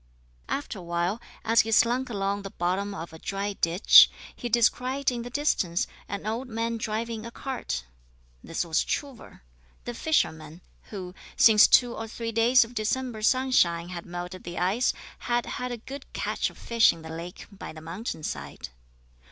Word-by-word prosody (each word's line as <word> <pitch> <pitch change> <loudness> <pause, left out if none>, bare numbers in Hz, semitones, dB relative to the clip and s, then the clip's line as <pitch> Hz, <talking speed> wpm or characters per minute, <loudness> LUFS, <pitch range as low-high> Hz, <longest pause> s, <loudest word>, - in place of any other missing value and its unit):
After 275 -7 -3
a - - -8
while, 175 +5 -1 0.2
as 230 +1 +5
he 225 - -5
slunk 245 +4 +3
along 200 -2 -1
the 195 - -7
bottom 195 +3 -2
of 165 -1 -7
a 160 - -10
dry 200 +3 -3
ditch, 175 +1 +7 0.3
he 240 - -5
descried 250 +4 +2
in 240 -1 -3
the 240 - -6
distance 220 - 0 0.2
an 200 +1 -5
old 230 +4 -2
man 230 +1 -2
driving 225 0 -3
a 235 - -6
cart. 240 - -4 0.6
This 165 - -2
was 160 -1 +1
Truvor, 275 - -5 0.4
the 240 - -4
fisherman, 165 - -1 0.3
who, 185 -4 -7 0.2
since 215 -2 +8
two 245 -2 +5
or 225 - -5
three 230 +1 -5
days 235 +2 +5
of 230 - -13
December 235 +1 -2
sunshine 215 -9 +2
had 175 -1 -7
melted 175 +1 -6
the 175 0 -7
ice, 195 +8 +2 0.3
had 240 0 0
had 250 0 -4
a 240 - -3
good 270 +4 -10
catch - - -1
of - - -17
fish 230 -1 +4
in 165 - -11
the 160 - -8
lake 170 +2 -7
by 200 - -8
the 155 - -10
mountain 165 +2 -6
side. 70 - -6
215 Hz, 175 wpm, -27 LUFS, 175-240 Hz, 0.6 s, since